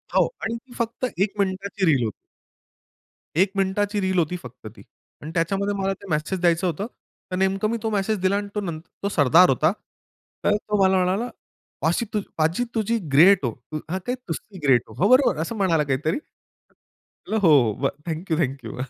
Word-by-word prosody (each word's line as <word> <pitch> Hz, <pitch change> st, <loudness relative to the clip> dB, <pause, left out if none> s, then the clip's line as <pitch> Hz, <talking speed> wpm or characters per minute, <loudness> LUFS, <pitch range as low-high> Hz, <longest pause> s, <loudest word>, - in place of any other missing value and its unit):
हो. -, -, +5 dB, 0.2 s
आणि 225 Hz, +1 st, -1 dB
ती 245 Hz, +2 st, -12 dB
फक्त 235 Hz, +1 st, -2 dB, 0.2 s
1 200 Hz, -, -2 dB
मिनिटाची 195 Hz, 0 st, -1 dB
रील 135 Hz, -5 st, +2 dB
होती. 110 Hz, -, -1 dB, 1.3 s
1 190 Hz, 0 st, +3 dB
मिनिटाची 205 Hz, +2 st, 0 dB
रील 190 Hz, -1 st, +1 dB
होती 170 Hz, +2 st, 0 dB
फक्त 125 Hz, -2 st, -11 dB
ती. -, -, -14 dB, 0.4 s
आणि 155 Hz, -, -7 dB
त्याच्यामध्ये 195 Hz, +4 st, 0 dB
मला 195 Hz, 0 st, 0 dB
ते 200 Hz, -, -14 dB
मेसेज 155 Hz, +4 st, -1 dB
द्यायचं 175 Hz, +1 st, +2 dB
होतं. 180 Hz, +5 st, -2 dB, 0.4 s
तर -, -, -1 dB
नेमकं 190 Hz, +2 st, +1 dB
मी 230 Hz, -, -1 dB
तो 225 Hz, -, 0 dB
मेसेज 210 Hz, +1 st, 0 dB
दिला 190 Hz, +1 st, +2 dB
आणि 205 Hz, 0 st, -3 dB
तो 210 Hz, -, 0 dB
नं 170 Hz, -5 st, -4 dB, 0.2 s
तो 200 Hz, -, +1 dB
सरदार 165 Hz, +1 st, +5 dB
होता. 150 Hz, +5 st, +3 dB, 0.7 s
तर 205 Hz, -, +3 dB
तो 210 Hz, -1 st, -1 dB
मला 190 Hz, 0 st, +4 dB
म्हणाला 195 Hz, +7 st, 0 dB, 0.5 s
"पाशी 165 Hz, +10 st, +1 dB, 0.3 s
पाजी 165 Hz, +8 st, +1 dB
तुझी 225 Hz, +1 st, +1 dB, 0.2 s
ग्रेट 180 Hz, +2 st, +6 dB
हो!" 120 Hz, -, 0 dB, 0.2 s
तू 155 Hz, -, -2 dB
हां, 185 Hz, +3 st, -1 dB
तेच. 250 Hz, +1 st, -1 dB
"तुस्सी 185 Hz, +3 st, -6 dB
ग्रेट 125 Hz, -3 st, +5 dB
हो!" -, -, -11 dB
हो. -, -, +6 dB
बरोबर. 255 Hz, -, +5 dB
असं 165 Hz, +8 st, -3 dB
म्हणाला 170 Hz, -6 st, +2 dB
काहीतरी. 145 Hz, +4 st, 0 dB
म्हणल 220 Hz, -6 st, -10 dB
"हो, 180 Hz, -, +5 dB, 0.3 s
हो. 135 Hz, -, +2 dB, 0.2 s
Thank 165 Hz, +2 st, -4 dB
you, 160 Hz, -, +2 dB
thank 135 Hz, -5 st, -1 dB
you." 110 Hz, -, -7 dB
190 Hz, 190 wpm, -23 LUFS, 160-205 Hz, 1.3 s, ग्रेट